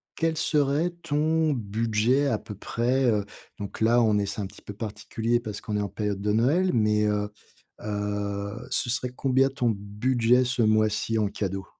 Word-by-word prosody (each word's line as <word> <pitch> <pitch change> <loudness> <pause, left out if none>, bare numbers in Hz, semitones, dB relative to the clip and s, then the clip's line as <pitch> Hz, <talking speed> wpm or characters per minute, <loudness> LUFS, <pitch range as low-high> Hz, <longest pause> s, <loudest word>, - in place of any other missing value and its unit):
quel 165 -1 0
serait 150 +2 +1
ton 155 0 +1
budget 115 +4 +1
à 115 -6 +1
peu 105 - -9
près, 125 +6 0
heu, 105 -2 0 0.3
donc 100 +2 -7
là, 120 +2 +4
on 110 -2 +3
est 100 - +1
c'est 105 - -4
un 100 - -2
petit - - -15
peu 105 - -8
particulier 115 +2 -2
parce 105 -4 -5
qu'on 105 - -4
est 105 - +1
en 100 - -2
période 100 0 -3
de 105 0 0
Noël, 150 - +3
mais, 105 -2 +2
heu 105 0 0 0.5
heu, 105 +2 -3
ce 120 - +1
serait 125 +1 0
combien 135 0 +3
ton 125 -4 0
budget 115 +5 +2
ce 125 0 0
mois-ci 110 0 +2
en 105 - +2
cadeau? 95 -1 -3
110 Hz, 185 wpm, -26 LUFS, 105-130 Hz, 0.5 s, là